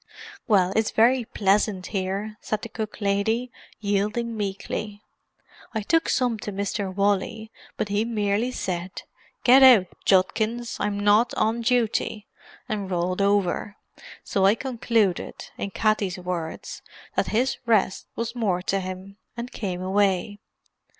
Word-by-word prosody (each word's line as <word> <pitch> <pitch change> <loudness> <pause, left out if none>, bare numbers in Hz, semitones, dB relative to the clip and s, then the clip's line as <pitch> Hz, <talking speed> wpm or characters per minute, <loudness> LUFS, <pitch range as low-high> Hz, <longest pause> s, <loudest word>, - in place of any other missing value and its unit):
"Well, 190 -5 +3
it's 220 0 +2
very 240 +2 +3
pleasant 200 -2 +1
here," 195 +2 -2
said 215 - -3
the 230 - -5
cook 215 0 -6
lady, 220 +5 0 0.3
yielding 210 +3 -1
meekly. 205 0 -4 0.7
"I 220 - 0
took 325 +9 +2
some 245 -4 +1
to 210 - -5
Mr. 200 0 -2
Wally, 205 +3 0 0.3
but 210 - -2
he 205 +1 +1
merely 215 0 0
said, 185 -6 -4 0.4
'Get 255 +2 +7
out, 250 -8 +8 0.2
Judkins; 220 +5 +1
I'm 205 0 -1
not 210 +4 +3
on 225 +2 +1
duty!' 230 -3 0 0.4
and 205 -5 -3
rolled 180 +1 -1
over. 200 0 +1 0.5
So 195 - 0
I 195 +3 +5
concluded, 230 -6 0 0.2
in 200 - -2
Katty's 205 -2 0
words, 180 -3 -5 0.3
that - - +1
'his 240 +3 +1
resht 210 -4 +2
was 230 0 -3
more 200 -7 0
to 195 +1 0
him,' 185 +1 -7 0.2
and 240 +1 -5
came 185 -6 -4
away." 195 +1 +1
205 Hz, 135 wpm, -25 LUFS, 195-225 Hz, 0.7 s, out